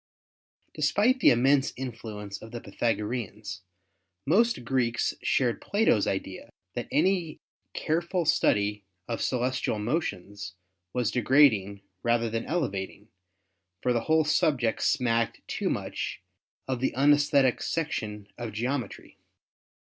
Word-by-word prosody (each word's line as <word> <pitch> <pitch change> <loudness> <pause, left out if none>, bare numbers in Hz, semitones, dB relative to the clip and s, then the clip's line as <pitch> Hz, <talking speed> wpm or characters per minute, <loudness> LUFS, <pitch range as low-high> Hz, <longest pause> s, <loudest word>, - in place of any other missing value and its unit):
Despite 205 - +2
the - - +6
immense 135 +3 +3
influence 110 -5 -6
of 110 - -10
the 120 +1 -6
Pythagoreans, 105 -1 -3 0.6
most 195 - +2
Greeks 120 -2 +1
shared 125 -3 +1
Plato's 200 - +2
idea 95 -1 -4 0.2
that 120 - -4
any 175 -1 +1 0.4
careful 170 +2 0
study 105 -8 +2 0.2
of 115 - -3
celestial 125 -2 0
motions 105 - -3 0.4
was 125 -1 0
degrading 110 -6 +3 0.2
rather 115 -1 +1
than 115 0 -2
elevating, 105 - -3 0.7
for 125 - +2
the 120 - +1
whole 160 0 +4
subject 130 -6 +1
smacked 115 -4 0
too - - -2
much - - -4 0.4
of 130 -2 -1
the 130 - 0
unesthetic 140 -1 +4
section 110 -10 -3
of 115 -3 -5
geometry. 120 0 -4
120 Hz, 110 wpm, -28 LUFS, 105-145 Hz, 0.7 s, the